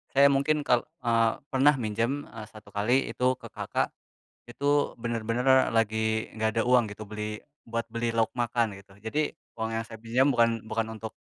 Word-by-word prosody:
saya 140 Hz, +1 st, +7 dB
mungkin 145 Hz, +2 st, +2 dB
kal 125 Hz, 0 st, +2 dB, 0.2 s
eee, 115 Hz, -1 st, +3 dB, 0.2 s
pernah 140 Hz, +2 st, +5 dB
minjem, 115 Hz, +4 st, -1 dB
eee, 110 Hz, -1 st, -8 dB
1 110 Hz, 0 st, -14 dB
kali 120 Hz, +6 st, +1 dB
itu 130 Hz, +1 st, +1 dB
ke -, -, -11 dB
kakak, -, -, -2 dB, 0.5 s
itu 145 Hz, +4 st, +1 dB
bener-bener 120 Hz, +3 st, +2 dB
lagi 110 Hz, 0 st, +1 dB
enggak 110 Hz, 0 st, +1 dB
ada -, -, +3 dB
uang 125 Hz, -2 st, +5 dB
gitu, 110 Hz, +1 st, -8 dB
beli 105 Hz, 0 st, -5 dB, 0.2 s
buat 115 Hz, 0 st, -3 dB
beli 115 Hz, 0 st, -2 dB
lauk 115 Hz, -1 st, +2 dB
makan 115 Hz, -3 st, 0 dB
gitu. 100 Hz, 0 st, -17 dB
Jadi, 145 Hz, +8 st, -1 dB, 0.2 s
uang 110 Hz, 0 st, -2 dB
yang 115 Hz, -, -1 dB
saya 110 Hz, -, -9 dB
pinjam 120 Hz, +5 st, +2 dB
bukan 115 Hz, -2 st, +2 dB
bukan 110 Hz, 0 st, -1 dB
untuk 110 Hz, 0 st, -6 dB
115 Hz, 175 wpm, -28 LUFS, 110-130 Hz, 0.5 s, saya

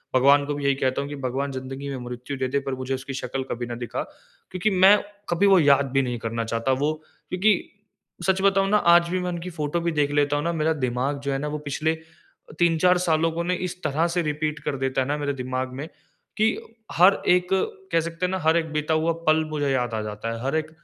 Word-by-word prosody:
भगवान 140 Hz, +2 st, +5 dB
को 145 Hz, -, -2 dB
भी 145 Hz, -, -5 dB
यही 140 Hz, -1 st, +3 dB
कहता 130 Hz, 0 st, 0 dB
हूँ 140 Hz, -, -5 dB
कि 145 Hz, -, -5 dB
भगवान 135 Hz, +3 st, -2 dB
ज़िंदगी 135 Hz, +1 st, -6 dB
में 135 Hz, -, -4 dB
मृत्यु 125 Hz, +3 st, -6 dB
दे 130 Hz, 0 st, -1 dB
दे 140 Hz, +2 st, 0 dB
पर 135 Hz, -1 st, -4 dB
मुझे 130 Hz, +1 st, -4 dB
उसकी 135 Hz, +1 st, -7 dB
शक्ल 130 Hz, 0 st, -3 dB
कभी 120 Hz, 0 st, -3 dB
ना 120 Hz, 0 st, -5 dB
दिखा। -, -, -4 dB, 0.5 s
क्योंकि 185 Hz, +4 st, 0 dB
मैं 190 Hz, +1 st, +6 dB, 0.3 s
कभी 175 Hz, +4 st, +3 dB
वो 195 Hz, -2 st, +6 dB
याद 140 Hz, -3 st, +4 dB
भी 135 Hz, +1 st, +3 dB
नहीं 125 Hz, -2 st, -2 dB
करना 115 Hz, +1 st, -3 dB
चाहता 115 Hz, +3 st, -1 dB
वो 155 Hz, +1 st, +2 dB, 0.4 s
क्योंकि 200 Hz, +4 st, +3 dB, 0.7 s
सच 190 Hz, 0 st, +2 dB
बताऊँ 195 Hz, 0 st, +3 dB
ना 210 Hz, -, +4 dB, 0.2 s
आज 170 Hz, 0 st, +5 dB
भी 185 Hz, +1 st, 0 dB
मैं 180 Hz, 0 st, -2 dB
उनकी 175 Hz, +1 st, -5 dB
फोटो 155 Hz, -1 st, -2 dB
भी 170 Hz, 0 st, 0 dB
देख 145 Hz, -2 st, +1 dB
लेता 145 Hz, 0 st, +2 dB
हूँ 145 Hz, -, -1 dB
ना, 170 Hz, +1 st, 0 dB
मेरा 160 Hz, 0 st, +1 dB
दिमाग 130 Hz, 0 st, -1 dB
जो 140 Hz, 0 st, -2 dB
है 135 Hz, -, 0 dB
ना 150 Hz, -, -3 dB
वो 150 Hz, 0 st, -3 dB
पिछले 160 Hz, +3 st, 0 dB
अ, 160 Hz, -1 st, -21 dB
3-4 175 Hz, +1 st, +4 dB
सालों 165 Hz, -2 st, +1 dB
को 170 Hz, +1 st, -3 dB
इस 180 Hz, 0 st, -4 dB
तरह 155 Hz, +4 st, +1 dB
से 175 Hz, +1 st, 0 dB
रिपीट 150 Hz, -1 st, -2 dB
कर 140 Hz, -, -2 dB
देता 130 Hz, 0 st, 0 dB
है 130 Hz, -, -1 dB
ना 145 Hz, +1 st, -1 dB
मेरे 145 Hz, -1 st, -2 dB
दिमाग 130 Hz, 0 st, -3 dB
में 140 Hz, +4 st, -6 dB, 0.5 s
कि 215 Hz, +1 st, +4 dB, 0.5 s
हर 180 Hz, +4 st, +6 dB
1 180 Hz, 0 st, +4 dB, 0.4 s
कह -, -, +3 dB
सकते 165 Hz, +2 st, -3 dB
हैं -, -, -1 dB
ना 190 Hz, -, 0 dB
हर 160 Hz, 0 st, +3 dB
1 165 Hz, -, 0 dB
बीता 150 Hz, +1 st, 0 dB
हुआ 160 Hz, +1 st, +2 dB, 0.2 s
पल 155 Hz, 0 st, +4 dB
मुझे 150 Hz, -2 st, -2 dB
याद 125 Hz, -3 st, 0 dB
आ 110 Hz, -, -1 dB
जाता 105 Hz, +1 st, -5 dB
है, 115 Hz, -, -6 dB
हर 135 Hz, +3 st, -1 dB
1 155 Hz, 0 st, -1 dB
145 Hz, 245 wpm, -24 LUFS, 135-170 Hz, 0.7 s, मैं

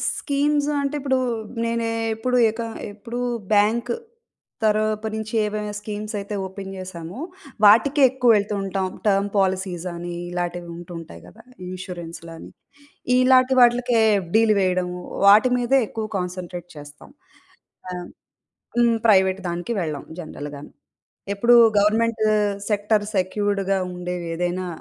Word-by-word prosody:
Schemes 290 Hz, 0 st, 0 dB
అంటే, 280 Hz, +1 st, -2 dB
ఇప్పుడు 265 Hz, -2 st, +1 dB, 0.5 s
నేనేప్పుడు 230 Hz, +1 st, -1 dB
ఎక 230 Hz, +1 st, -6 dB, 0.3 s
ఎప్పుడు 230 Hz, +4 st, -7 dB, 0.3 s
బ్యాంక్ 215 Hz, +3 st, +2 dB, 0.7 s
తరపు 215 Hz, 0 st, +1 dB
నుంచి 220 Hz, +1 st, -5 dB
ఏవైనా 210 Hz, 0 st, -3 dB
స్కీమ్స్ 210 Hz, +1 st, -6 dB
అయితే 200 Hz, +1 st, -6 dB
ఓపెన్ 195 Hz, +1 st, -8 dB
చేశామో, 185 Hz, +3 st, -8 dB, 0.5 s
వాటికే 270 Hz, +8 st, +5 dB
ఎక్కువెళ్తూంటాం. 205 Hz, -6 st, +1 dB, 0.2 s
టర్మ్ 200 Hz, 0 st, +2 dB
పాలిసీస్ 185 Hz, -2 st, -1 dB
అని 175 Hz, 0 st, -6 dB, 0.2 s
ఇలాటివి 175 Hz, -1 st, -4 dB
ఉంటుంటాయి 170 Hz, -1 st, -9 dB
కదా! 225 Hz, -, -15 dB, 0.3 s
ఇన్స్యూరెన్స్‌లని 170 Hz, -3 st, -8 dB, 0.7 s
ఇలాటి 255 Hz, +1 st, +5 dB
వాట్లికే 240 Hz, -1 st, +4 dB, 0.2 s
ఎఫ్‌డిలు 215 Hz, +5 st, +2 dB
వేయడం. 185 Hz, -1 st, +1 dB, 0.4 s
వాటి 215 Hz, +6 st, +7 dB
మీదే 245 Hz, +2 st, +2 dB
ఎక్కువ 220 Hz, -1 st, -4 dB
కాన్స‌న్‌ట్రేట్ 180 Hz, -1 st, -5 dB
చేస్తాం. 145 Hz, 0 st, -12 dB, 0.8 s
ఆహ్, 180 Hz, -, -4 dB
హ్మ్. 175 Hz, -, -9 dB, 0.8 s
హ్మ్, 230 Hz, -, +2 dB
ప్రైవేట్ 190 Hz, -2 st, +4 dB
దానికి 175 Hz, +7 st, -3 dB
వెళ్ళాం 155 Hz, -4 st, -4 dB
జనరల్‌గాను. 145 Hz, -3 st, -8 dB, 0.6 s
ఎప్పుడు 235 Hz, +4 st, +4 dB, 0.2 s
గవర్నమెంట్ 220 Hz, +2 st, +2 dB, 0.5 s
సెక్టార్ 210 Hz, 0 st, +1 dB
సెక్యూర్డ్‌గా 195 Hz, 0 st, 0 dB, 0.2 s
ఉండేవేదైనా, 180 Hz, 0 st, -3 dB
205 Hz, 105 wpm, -22 LUFS, 180-230 Hz, 0.8 s, వాటి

